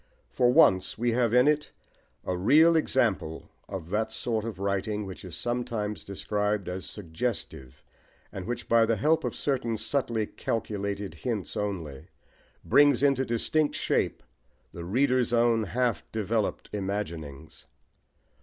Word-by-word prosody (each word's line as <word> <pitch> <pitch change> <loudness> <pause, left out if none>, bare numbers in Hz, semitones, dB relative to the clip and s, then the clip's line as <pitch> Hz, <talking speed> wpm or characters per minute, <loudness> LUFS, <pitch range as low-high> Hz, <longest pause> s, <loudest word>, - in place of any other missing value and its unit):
For 125 -1 +3
once 95 - +4
we 120 +1 +1
have 120 -1 +2
in 125 +3 +5
it 150 0 +1 0.5
a 90 - -1
real 150 - +5
example 115 - 0 0.2
of 95 -3 -6
that 110 +2 0
sort 110 -3 -1
of 115 -5 -5
writing 100 +2 -2
which 95 -1 -9
is 90 -3 -7
sometimes 120 -1 -2
described 105 0 -2
as 90 +1 -4
suggestive, 85 - -5 0.5
and 95 0 -7
which 120 0 -4
by 115 -1 +4
the 115 - +2
help 155 +10 +2
of - - -3
certain 125 -5 -1
subtly 115 -1 -1
calculated 100 -3 -3
hints 115 -7 -4
only, 85 -10 -4 0.6
brings 145 -1 +5
into 135 -2 +3
distinct 145 +6 0
shape - - 0 0.5
the 85 -1 -7
reader's 125 +4 +2
own 115 -2 +3
half 120 +1 0
developed 110 0 -2
imaginings. 85 -8 -5
110 Hz, 135 wpm, -28 LUFS, 95-125 Hz, 0.6 s, in